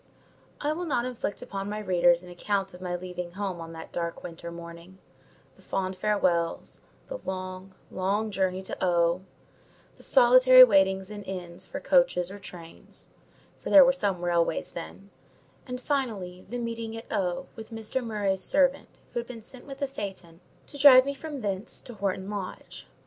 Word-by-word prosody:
I 295 +1 0
will 350 +3 -4
not 245 -5 0
inflict 250 -3 -4
upon 195 -5 -5
my 210 - -3
readers 175 -4 +3
an 180 - -11
account 195 +2 -2
of 180 - -12
my 180 -1 -2
leaving 180 -1 -6
home 190 -3 -4
on 165 0 -8
that 160 0 -9
dark 170 -1 -4
winter 170 -1 -7
morning: 170 +2 -10 0.6
the - - -21
fond 190 -1 -2
farewells, 185 -4 0 0.3
the - - -6
long, 185 0 -6 0.2
long 205 +3 -1
journey 190 -1 -1
to 190 - -6
O——, 175 0 +2 0.8
the - - -17
solitary 255 0 +8
waitings 195 -3 +3
in 205 -1 -6
inns 185 -1 -7
for 280 - -5
coaches 260 -11 +2
or 205 - -9
trains—for 170 -4 -13
there 285 -2 +9
were 265 - +4
some 195 -9 -1
railways 170 -2 +1
then—and, 200 +7 -11
finally, 215 -11 -3
the 245 - -4
meeting 230 -1 -4
at 225 - -8
O—— 180 -4 -1
with 225 -1 -9
Mr. 225 +3 -3
Murray's 205 -4 -1
servant, 275 +5 +2 0.2
who - - -1
had 235 - -6
been 230 -3 -9
sent 255 +3 -11
with 275 -1 -8
the 280 0 -1
phaeton 190 -8 -7 0.2
to 285 - -10
drive 265 -2 +9
me 280 - -2
from 290 -1 -7
thence 200 0 -3
to 245 - -9
Horton 195 -2 -2
Lodge. 200 -3 -7
195 Hz, 170 wpm, -27 LUFS, 180-240 Hz, 0.8 s, there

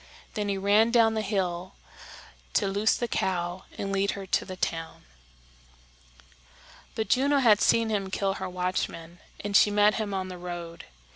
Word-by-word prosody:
Then 210 -1 -2
he 200 - -1
ran 205 +3 +4
down 230 -2 +4
the 220 - -1
hill 185 -3 -2 0.8
to - - +3
loose 205 +3 +2
the 240 - -2
cow 180 -3 -2
and 195 - -3
lead 195 +1 +1
her 195 - -6
to 185 - +1
the 185 - -7
town. 165 -2 -4 1.9
But 220 - -2
Juno 280 +3 +3
had 230 -6 +5
seen 230 -1 +3
him 195 -2 -1
kill 195 0 -1
her - - -3
watchman, 180 -2 -3 0.2
and 200 0 -3
she 210 - +6
met 205 0 +4
him 210 -2 -3
on 190 -1 -2
the 180 -1 -8
road. 175 -1 -7
195 Hz, 165 wpm, -27 LUFS, 180-215 Hz, 1.9 s, she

